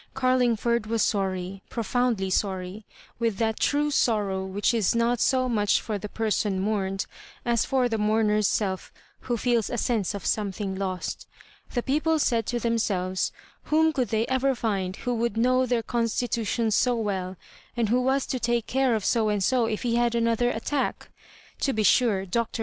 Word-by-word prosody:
Oarlingford 240 Hz, -3 st, +2 dB
was 225 Hz, 0 st, +1 dB
sorry, 190 Hz, -1 st, -1 dB
profoundly 230 Hz, -4 st, 0 dB
sorry, 190 Hz, +1 st, -2 dB, 0.3 s
with 230 Hz, -4 st, 0 dB
that 220 Hz, 0 st, 0 dB
true 295 Hz, +1 st, +1 dB
sorrow 205 Hz, -8 st, +1 dB
which 195 Hz, +4 st, 0 dB
is 225 Hz, -2 st, +2 dB
not 235 Hz, +1 st, +2 dB
so 255 Hz, +1 st, +2 dB
much 210 Hz, -4 st, +2 dB
for 215 Hz, -3 st, -4 dB
the 210 Hz, -, -6 dB
person 210 Hz, -3 st, 0 dB
mourned 195 Hz, -1 st, -1 dB, 0.4 s
as 235 Hz, -2 st, +2 dB
for 260 Hz, -2 st, +2 dB
the 225 Hz, -2 st, -2 dB
mourn 215 Hz, 0 st, +2 dB
er's 210 Hz, -1 st, +3 dB
self, 190 Hz, -3 st, -1 dB, 0.3 s
who 240 Hz, -2 st, -2 dB
feels 235 Hz, -1 st, +1 dB
a 240 Hz, -, -3 dB
sense 215 Hz, -5 st, 0 dB
of 200 Hz, -, -7 dB
something 200 Hz, -1 st, -1 dB
lost 190 Hz, -1 st, -4 dB, 0.5 s
The 240 Hz, -, 0 dB
people 310 Hz, +4 st, +1 dB
said 230 Hz, -6 st, +1 dB
to 240 Hz, -, -1 dB
themselves, 195 Hz, -6 st, 0 dB, 0.3 s
Whom 315 Hz, +1 st, +3 dB
could 255 Hz, -5 st, 0 dB
they 220 Hz, +2 st, 0 dB
ever 260 Hz, +1 st, +1 dB
find 195 Hz, -6 st, -2 dB
who 245 Hz, -, -3 dB
would 235 Hz, -2 st, -1 dB
know 255 Hz, +2 st, +3 dB
their 240 Hz, -2 st, 0 dB
constitu 230 Hz, -1 st, -1 dB
tions 225 Hz, 0 st, 0 dB
so 245 Hz, +3 st, +3 dB
well, 190 Hz, -4 st, -3 dB, 0.4 s
and 230 Hz, -3 st, +1 dB
who 245 Hz, +3 st, +3 dB
was 265 Hz, +1 st, +1 dB
to 255 Hz, -, -3 dB
take 235 Hz, -1 st, 0 dB
care 260 Hz, -2 st, +1 dB
of 215 Hz, -, -3 dB
So 225 Hz, -3 st, +2 dB
and 205 Hz, -2 st, 0 dB
so 245 Hz, +1 st, +2 dB
if 215 Hz, +1 st, -3 dB
he 235 Hz, -1 st, +1 dB
had 240 Hz, 0 st, +1 dB
another 230 Hz, +1 st, +2 dB
attack? 265 Hz, +4 st, -2 dB, 0.5 s
To 270 Hz, -, 0 dB
be 215 Hz, -, 0 dB
sure. 205 Hz, -3 st, +3 dB
Dr. 230 Hz, +5 st, -2 dB
225 Hz, 180 wpm, -26 LUFS, 205-245 Hz, 0.5 s, er's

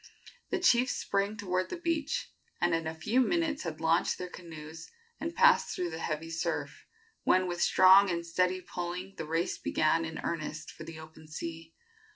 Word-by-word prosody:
The -, -, 0 dB
chiefs 255 Hz, -8 st, +3 dB
sprang 200 Hz, +2 st, -1 dB
toward 185 Hz, -2 st, -1 dB
the 360 Hz, -, -4 dB
beach, 330 Hz, -3 st, -2 dB, 0.3 s
and 175 Hz, -1 st, +2 dB
in 165 Hz, -1 st, 0 dB
a 160 Hz, -, -4 dB
few 215 Hz, +11 st, +2 dB
minutes 325 Hz, +2 st, +1 dB
had 160 Hz, -3 st, -5 dB
launched 165 Hz, +1 st, +2 dB
their 180 Hz, -1 st, -6 dB
canoes 160 Hz, -2 st, -9 dB, 0.3 s
and 330 Hz, +2 st, -4 dB
passed 480 Hz, +2 st, +5 dB
through 175 Hz, -2 st, -2 dB
the 160 Hz, -, -5 dB
heavy 165 Hz, 0 st, -3 dB
surf, 165 Hz, 0 st, -3 dB, 0.3 s
when 185 Hz, 0 st, +3 dB
with 175 Hz, -1 st, -3 dB
strong 190 Hz, +1 st, +7 dB
and 170 Hz, -1 st, -2 dB
steady 180 Hz, +2 st, +1 dB
pulling 180 Hz, +2 st, -5 dB
the -, -, -4 dB
race 165 Hz, +2 st, -1 dB
began 160 Hz, +1 st, +2 dB
in 160 Hz, 0 st, -5 dB
earnest 155 Hz, -2 st, -4 dB
for 155 Hz, -, -10 dB
the 165 Hz, 0 st, -8 dB
open 160 Hz, 0 st, -13 dB
sea. 165 Hz, +1 st, -7 dB
175 Hz, 180 wpm, -30 LUFS, 160-200 Hz, 0.3 s, strong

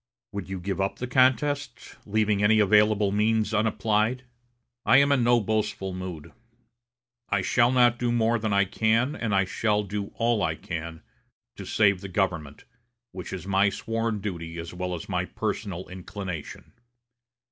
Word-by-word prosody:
Would 100 Hz, -2 st, -6 dB
you 95 Hz, -1 st, -4 dB
give 95 Hz, +2 st, -3 dB
up 95 Hz, -, -1 dB
the 125 Hz, -, -5 dB
contest, 130 Hz, +3 st, +1 dB
leaving 105 Hz, -1 st, +1 dB
any 110 Hz, +1 st, +5 dB
available 105 Hz, 0 st, +4 dB
means 110 Hz, +1 st, +1 dB
unapplied? 110 Hz, +3 st, +1 dB, 0.6 s
I 120 Hz, +5 st, +5 dB
am 140 Hz, +1 st, +4 dB
in 135 Hz, -4 st, +3 dB
no 120 Hz, 0 st, +4 dB
boastful 105 Hz, -3 st, -2 dB
mood. 90 Hz, -4 st, -7 dB, 1.0 s
I 100 Hz, -2 st, +1 dB
shall 120 Hz, +4 st, +3 dB
not 120 Hz, -2 st, +4 dB
do 120 Hz, -1 st, 0 dB
more 115 Hz, 0 st, +2 dB
than 110 Hz, 0 st, -2 dB
I 100 Hz, 0 st, +3 dB
can, 110 Hz, +7 st, +1 dB
and 110 Hz, -4 st, -1 dB
I 95 Hz, 0 st, +3 dB
shall 105 Hz, +2 st, 0 dB
do 100 Hz, 0 st, -4 dB
all 115 Hz, -2 st, +1 dB
I 80 Hz, -3 st, 0 dB
can, 80 Hz, -1 st, -6 dB, 0.5 s
to -, -, -8 dB
save 100 Hz, -4 st, +3 dB
the 100 Hz, -, -6 dB
government, 85 Hz, -6 st, -2 dB, 0.5 s
which 90 Hz, -1 st, -8 dB
is 95 Hz, -3 st, -6 dB
my 100 Hz, +1 st, +3 dB
sworn 115 Hz, 0 st, -3 dB
duty 85 Hz, -5 st, -5 dB
as 85 Hz, +1 st, -7 dB
well 90 Hz, 0 st, -3 dB
as 80 Hz, -, -8 dB
my -, -, -1 dB
personal 95 Hz, -4 st, -4 dB
inclination. 90 Hz, -3 st, -7 dB
105 Hz, 160 wpm, -26 LUFS, 95-115 Hz, 1.0 s, any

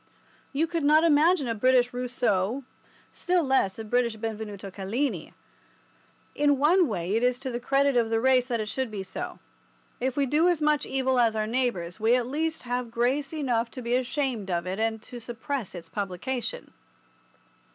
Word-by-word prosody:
You 295 Hz, +3 st, +1 dB
could 330 Hz, -1 st, -2 dB
not 305 Hz, +2 st, +5 dB
imagine 320 Hz, -1 st, +4 dB
a 230 Hz, -, 0 dB
British 245 Hz, +2 st, +3 dB
Rousseau, 245 Hz, -2 st, 0 dB, 0.5 s
still 360 Hz, -1 st, +1 dB
less 265 Hz, -8 st, +1 dB
a 225 Hz, -, -5 dB
British 235 Hz, +1 st, +1 dB
Benvenuto 215 Hz, -3 st, -6 dB
Cellini. 215 Hz, +9 st, -3 dB, 1.0 s
In 290 Hz, -1 st, +3 dB
one 335 Hz, +5 st, +4 dB
way 190 Hz, -3 st, -2 dB
it 225 Hz, -, +2 dB
is 250 Hz, 0 st, +2 dB
to 260 Hz, 0 st, -5 dB
the 240 Hz, -, -3 dB
credit 275 Hz, +2 st, +2 dB
of 235 Hz, -2 st, +2 dB
the 225 Hz, 0 st, +1 dB
race 255 Hz, 0 st, +3 dB
that 235 Hz, -3 st, -1 dB
it 215 Hz, -, -3 dB
should 260 Hz, +2 st, -2 dB
be 205 Hz, -3 st, -5 dB
so. 190 Hz, -, -6 dB, 0.6 s
If 260 Hz, +1 st, -2 dB
we 280 Hz, -, +3 dB
do 300 Hz, +6 st, +3 dB
as 350 Hz, -3 st, +2 dB
much 300 Hz, -2 st, +1 dB
evil 265 Hz, -1 st, +1 dB
as 230 Hz, -2 st, +3 dB
our 215 Hz, 0 st, 0 dB
neighbours 220 Hz, -7 st, -1 dB
we 225 Hz, +3 st, +4 dB
at 250 Hz, -1 st, +1 dB
least 315 Hz, +5 st, -2 dB
have 245 Hz, -1 st, -2 dB
grace 255 Hz, +5 st, 0 dB
enough 250 Hz, -7 st, -1 dB
to 255 Hz, +1 st, -8 dB
be 235 Hz, +1 st, -1 dB
ashamed 255 Hz, -4 st, -1 dB
of 170 Hz, -1 st, -1 dB
it 185 Hz, +3 st, -3 dB
and 225 Hz, 0 st, 0 dB
to 245 Hz, -, -9 dB
suppress 240 Hz, -1 st, -5 dB
its 170 Hz, -2 st, -8 dB
publication. 220 Hz, -, -4 dB
245 Hz, 185 wpm, -27 LUFS, 220-280 Hz, 1.0 s, not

